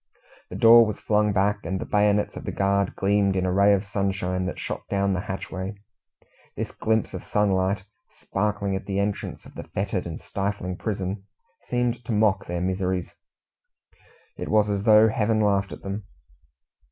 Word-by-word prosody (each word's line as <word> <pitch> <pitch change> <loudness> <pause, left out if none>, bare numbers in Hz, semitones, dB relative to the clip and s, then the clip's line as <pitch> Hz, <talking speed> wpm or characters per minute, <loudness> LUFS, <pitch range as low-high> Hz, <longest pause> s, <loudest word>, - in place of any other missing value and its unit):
The - - -7
door 115 +1 +8
was 105 - -4
flung 105 0 +2
back, 105 +1 +1
and 95 +3 -3
the - - -4
bayonets 105 0 +2
of - - -7
the - - -2
guard 100 0 +1
gleamed 100 0 +2
in 95 -1 0
a 90 - 0
ray 100 +2 +5
of 100 0 +2
sunshine 95 -2 -1
that 95 - -4
shot - - -4
down 100 -1 +1
the 90 - -1
hatchway. 95 +1 -4 0.8
This - - -4
glimpse 110 -1 0
of 95 - -6
sunlight 95 -1 +1 0.3
sparkling 100 -1 -2
at 95 - -5
the 100 -1 -2
entrance 100 0 -3
of - - -14
the - - -8
foetid 95 -2 -1
and 80 - -6
stifling 95 -2 -3
prison 95 -2 -3 0.4
seemed 120 0 -1
to - - -3
mock 105 -2 +2
their 85 0 -3
miseries. 95 -1 -1 1.2
It - - -5
was 105 -1 +3
as 100 -1 -1
though 110 0 +7
Heaven 110 0 +1
laughed 100 -2 +1
at - - -9
them. 100 +1 -5
100 Hz, 175 wpm, -25 LUFS, 95-105 Hz, 1.2 s, door